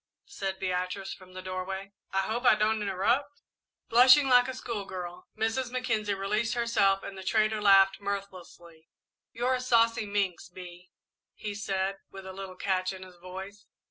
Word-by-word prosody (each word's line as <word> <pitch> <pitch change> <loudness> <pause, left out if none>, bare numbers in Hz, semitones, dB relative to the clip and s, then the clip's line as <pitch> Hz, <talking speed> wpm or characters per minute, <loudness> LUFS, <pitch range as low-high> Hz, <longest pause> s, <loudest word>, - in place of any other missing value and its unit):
said 195 -1 -4
Beatrice, 185 +1 -3
from 185 -1 -15
the 185 0 -8
doorway. 190 +1 -5 0.2
"I 195 - +1
hope 220 +5 -2
I 250 - +6
don't 215 0 +1
interrupt?" 235 +9 0 0.4
Blushing 255 +4 +7
like 245 -1 +6
a 260 - -3
schoolgirl, 190 -7 -6
Mrs. 225 +3 -1
Mackenzie 230 -5 -1
released 210 +4 -1
herself 220 -5 +2
and 200 - -7
the 190 - -8
trader 215 +2 +1
laughed 195 -1 +5
mirthlessly. 180 -5 -7 0.4
"You're 245 +3 0
a 255 - -1
saucy 230 -3 +3
minx, 200 -4 -2
Bee," 180 0 -11 0.5
he 210 -1 -5
said, 195 -1 -2
with 195 -1 -10
a 190 - -7
little 190 -1 -8
catch 185 0 -1
in 190 -1 -9
his 185 -1 -14
voice. 190 +3 -9
195 Hz, 160 wpm, -29 LUFS, 185-225 Hz, 0.5 s, Blushing